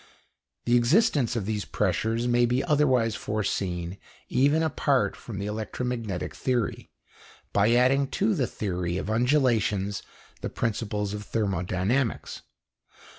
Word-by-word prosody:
The 120 - +3
existence 130 - +3
of 110 -5 -2
these 105 -1 -2
pressures 110 +5 0
may 120 0 +3
be 125 +3 +1
otherwise 130 -8 +2
foreseen 95 -4 -2 0.3
even 145 +5 +3
apart 145 -4 +1
from 110 -5 -8
the 100 - -3
electromagnetic 110 -1 -3
theory, 125 -4 -2 0.6
by 105 +3 +4
adding 130 +3 +4
to 210 +2 +2
the 135 -10 0
theory 90 -3 -3
of 105 - -3
undulations 110 -6 +1 0.4
the - - -3
principles 105 -2 -2
of 105 - -4
thermodynamics. 100 +3 -1
115 Hz, 120 wpm, -27 LUFS, 100-125 Hz, 0.6 s, by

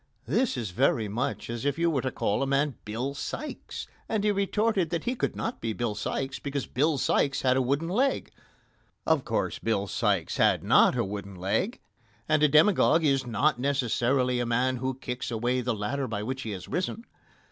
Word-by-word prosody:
This 255 - +1
is 110 -6 -3
very 115 +1 +2
much 125 +7 -3
as 120 +1 -4
if 145 +1 0
you 170 0 +2
were 135 -5 0
to 130 - -1
call 105 -2 -1
a 135 - 0
man 140 +1 +1
"Bill 120 +6 -3
Sikes," 295 - -6 0.2
and 215 -2 0
he 210 - +3
retorted 200 -2 +1
that 170 -1 -2
he 245 - 0
could 255 - -2
not 230 - -4
be 115 -1 -2
Bill 120 -1 -2
Sikes 130 +5 -3
because 140 -1 -3
Bill 150 +3 +1
Sikes 140 +1 +1
had 130 -1 +4
a 130 - +3
wooden 140 +6 0
leg. 255 +10 0 0.7
Of 160 -4 +2
course, 115 - -1
Bill 110 -3 0
Sikes 100 - 0
had - - +3
not - - +5
a - - +1
wooden 100 0 -6
leg, 100 - -1 0.5
and 155 -1 +3
a 150 - +6
demagogue 160 +2 +5
is 135 -3 +2
not 120 +4 +1
necessarily 125 -1 +1
a 120 - 0
man 125 +2 +1
who 130 +1 -2
kicks 125 -1 -4
away 120 +2 0
the 125 -1 -1
ladder 130 +6 -2
by 105 -3 -3
which 130 +4 -3
he 115 - -5
has 95 -3 -6
risen. 200 +6 -3
130 Hz, 200 wpm, -28 LUFS, 120-155 Hz, 0.7 s, a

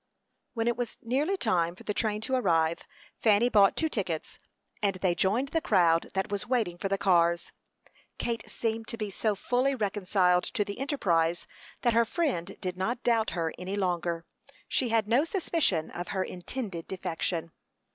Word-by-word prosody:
When 225 0 0
it 240 - +2
was 245 -1 -4
nearly 285 +11 +1
time 175 - +1
for - - -14
the 210 - -2
train 210 -1 -1
to 260 - -3
arrive, 170 -9 +2 0.3
Fanny 220 +2 +4
bought 200 -4 +5
two 320 - +2
tickets, 185 - -3 0.4
and 200 -2 +1
they 185 -1 +1
joined 215 +10 +1
the 325 - 0
crowd 170 - +3
that 190 +1 -1
was 200 -2 -2
waiting 220 -9 0
for 195 - -2
the 195 - +1
cars. 170 -3 +2 0.7
Kate 235 -1 -3
seemed 225 -1 -2
to 230 - -4
be 210 -2 -3
so 210 +1 0
fully 255 +6 +1
reconciled 195 -4 +2
to 205 - +2
the 200 +3 -6
enterprise, 175 - +1 0.4
that 240 -2 +3
her 235 +1 +5
friend 230 - -2
did 180 -1 -3
not 230 +6 -2
doubt 230 -2 +2
her 165 -1 -1
any 185 +2 -3
longer; 175 -3 -1 0.4
she 255 - +1
had 225 -2 +2
no 240 +6 +4
suspicion 325 - 0
of 175 0 -5
her 190 -1 -1
intended 185 -1 -5
defection. 170 -2 -3
205 Hz, 175 wpm, -29 LUFS, 175-235 Hz, 0.7 s, bought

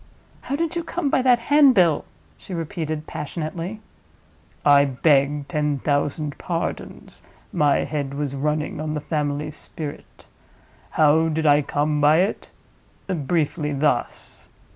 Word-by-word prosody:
"How 275 - -3
did 335 +2 -2
you 340 - -1
come 320 -3 -2
by - - +3
that 250 -1 +5
handbill?" 240 - +4 0.3
she 180 - -8
repeated, 155 -2 -4
passionately. 165 +7 -5 0.8
"I 145 -1 +7
beg 140 +1 +2
ten 150 -3 -1
thousand 145 +1 -1
pardons! - - -5 0.3
My 145 -2 +2
head 140 -2 -3
was 145 -1 -3
running 150 +2 -2
on 155 0 -3
the - - -1
family 150 0 -2
spirit.—How 155 0 -3
did 160 0 -1
I 145 0 +5
come 150 +1 -1
by 150 +3 +5
it? 195 +4 -2 0.6
Briefly 155 -3 -1
thus." 140 -3 -2
150 Hz, 120 wpm, -23 LUFS, 145-170 Hz, 0.8 s, I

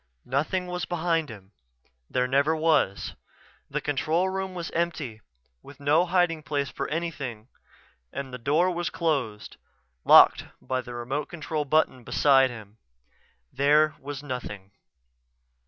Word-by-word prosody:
Nothing 150 +8 -1
was 180 -1 -3
behind 165 -3 0
him. 100 -3 -12 0.6
There 125 0 +1
never 140 +5 +2
was. 155 -11 +1 0.6
The 150 +2 -2
control 155 +6 0
room 190 0 -4
was 170 -1 -5
empty, 155 -10 -2 0.4
with 140 - -14
no 150 +5 +3
hiding 175 -3 +2
place 140 -1 -2
for - - -4
anything, 140 -8 -4 0.6
and 135 -2 -6
the 125 - -6
door 155 +9 +2
was 175 0 -2
closed, 135 -11 -2 0.5
locked - - +7
by 130 0 -2
the 120 -1 -9
remote 135 +5 -3
control 155 -2 -3
button 140 -4 +1
beside 135 +1 +4
him. 110 -2 -11 0.7
There 150 +3 +4
was 145 +1 -7
nothing. 105 -8 -6
145 Hz, 130 wpm, -26 LUFS, 130-165 Hz, 0.7 s, locked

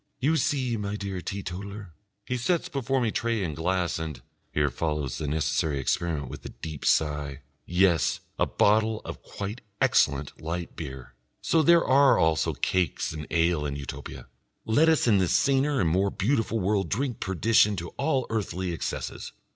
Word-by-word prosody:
"You 150 +6 +2
see, 130 -7 0
my 100 0 -3
dear 100 -3 -4
Teetotaler? 100 0 -6 0.3
he 125 - -2
sets 165 +8 0
before 135 -1 0
me 115 -3 +1
tray 115 -3 -1
and 80 -5 -3
glass 90 +1 0
and..." 80 -3 -5 0.3
Here 75 -2 +1
follows 75 -1 -2
the 75 - -3
necessary 75 0 0
experiment 70 0 -1
and 70 - -9
a - - -7
deep 80 -3 -7
sigh.... 75 -2 +1 0.2
"Yes, 90 -5 +3 0.2
a - - +3
bottle 110 +1 +2
of - - -7
quite 105 +4 -6 0.2
excellent 70 0 +2
light 85 +2 -4
beer! 65 -5 -8 0.3
So 165 - +3
there 170 +2 +5
are 135 0 +5
also 80 -1 +2
cakes 90 -4 -1
and 75 -1 -6
ale 85 -2 +2
in 70 -1 -3
Utopia! 70 -1 -7 0.4
Let 150 +9 +4
us 160 - +3
in 105 -5 +4
this 90 -2 +1
saner 140 0 +2
and 85 - +2
more 95 +3 +2
beautiful 115 +2 0
world 95 -2 0
drink 125 +2 -1
perdition 105 +2 +3
to 85 -2 -5
all 140 -3 0
earthly 95 -4 -2
excesses. 80 - -4
95 Hz, 165 wpm, -27 LUFS, 80-115 Hz, 0.4 s, there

